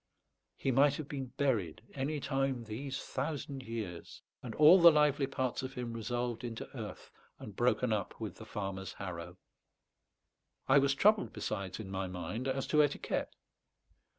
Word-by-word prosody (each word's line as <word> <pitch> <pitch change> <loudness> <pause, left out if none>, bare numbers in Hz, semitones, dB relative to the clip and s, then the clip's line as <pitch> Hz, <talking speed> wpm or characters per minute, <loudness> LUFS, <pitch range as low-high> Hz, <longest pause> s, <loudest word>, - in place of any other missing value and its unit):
He 135 - 0
might 140 +2 +5
have 155 -2 -5
been 135 -3 -4
buried 110 - 0
any 145 +2 -2
time 135 -3 -1
these 130 +5 -5
thousand 140 0 -4
years, 110 -8 -6 0.2
and - - -6
all 160 +5 +8
the 170 - +11
lively 150 -2 +3
parts 130 -2 -2
of 130 +1 -6
him 120 -2 -4
resolved 120 +1 -2
into 115 -2 -6
earth - - -7 0.3
and - - -9
broken - - +2
up - - -3
with - - -5
the - - -10
farmer's 95 -1 -4
harrow. 90 -2 -7 1.3
I 135 +1 +7
was 140 0 +2
troubled 210 +6 +4
besides 100 -3 -4
in 100 -3 -7
my 95 0 -2
mind 90 +8 -4
as 135 0 -1
to 150 - +7
etiquette. 145 -1 -1
130 Hz, 155 wpm, -33 LUFS, 110-140 Hz, 1.3 s, the